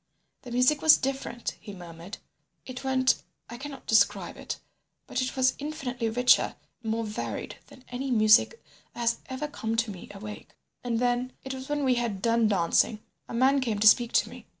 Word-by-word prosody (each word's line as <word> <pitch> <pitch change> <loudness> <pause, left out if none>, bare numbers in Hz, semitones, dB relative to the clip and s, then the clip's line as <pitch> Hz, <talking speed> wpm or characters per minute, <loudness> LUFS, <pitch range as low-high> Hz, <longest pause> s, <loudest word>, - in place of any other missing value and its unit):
"The 250 - -10
music 250 +5 +3
was 315 -1 +7
different," 265 -3 -4
he 205 - -9
murmured. 170 +1 -9 0.5
"It 255 0 -8
went—I 260 -2 -1
cannot 275 -1 -8
describe 220 0 +2
it; - - -6 0.5
but 250 - -2
it 255 - -3
was 260 -1 +3
infinitely 265 -6 -3
richer 245 +3 +3 0.3
and 225 -2 -3
more 230 +1 -1
varied 210 -1 -5
than 255 - -17
any 260 +2 -4
music 220 - +4 0.4
that - - -9
has 235 0 +2
ever 265 +3 -4
come 225 -6 -3
to 225 -1 0
me 180 -3 -10
awake. 210 +1 -10 0.3
"And 240 -2 -1
then—it 250 +2 -2
was 265 +1 -8
when 295 -1 -1
we 260 -2 +3
had 235 -5 -2
done 230 +2 +2
dancing—a 205 +4 0
man 270 +3 +3
came 230 -5 -1
to 215 +1 +4
speak 235 +2 +6
to - - +3
me. - - -12
245 Hz, 175 wpm, -27 LUFS, 220-260 Hz, 0.5 s, was